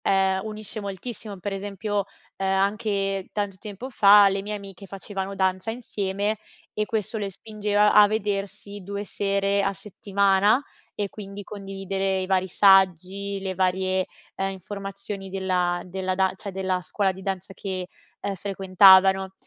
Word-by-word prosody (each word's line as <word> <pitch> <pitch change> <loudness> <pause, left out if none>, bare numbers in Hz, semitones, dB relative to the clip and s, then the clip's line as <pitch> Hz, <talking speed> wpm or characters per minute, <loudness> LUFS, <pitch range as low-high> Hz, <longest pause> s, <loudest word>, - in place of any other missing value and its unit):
ehm, 190 -1 +2
unisce 215 0 -6
moltissimo, 205 +1 -6
per 200 +2 -4
esempio, 200 +1 -2 0.3
uhm, 195 - -1
anche 195 0 0
tanto 205 -2 -3
tempo 215 +6 -8
fa 205 -3 +7
le 195 0 -1
mie 210 +2 -4
amiche 195 -1 -9
facevano 195 0 -5
danza 190 +2 0
insieme 205 -3 -2 0.3
e 210 - -1
questo 220 0 -2
le 200 -2 -3
spingeva 210 +1 +1
a 210 0 +8
vedersi 205 -1 -3
2 200 +2 -5
sere 200 0 0
a 195 0 0
settimana 200 +3 +2 0.3
e 205 -1 -2
quindi 200 0 -8
condividere 195 -1 -3
i 185 - -2
vari 190 0 +1
saggi, 195 +1 +3
le 190 -1 -3
varie, 185 0 +1 0.3
uhm, 195 - -1
informazioni 195 0 -7
della 180 -2 0
della 185 +1 -2
da 190 0 +2
cioè, 200 - -6
della 185 -1 -1
scuola 195 +3 0
di 190 +1 -11
danza 190 0 -4
che, 185 -2 -4 0.3
ehm, 200 - -2
frequentavano. 190 0 +5
195 Hz, 145 wpm, -25 LUFS, 190-205 Hz, 0.3 s, a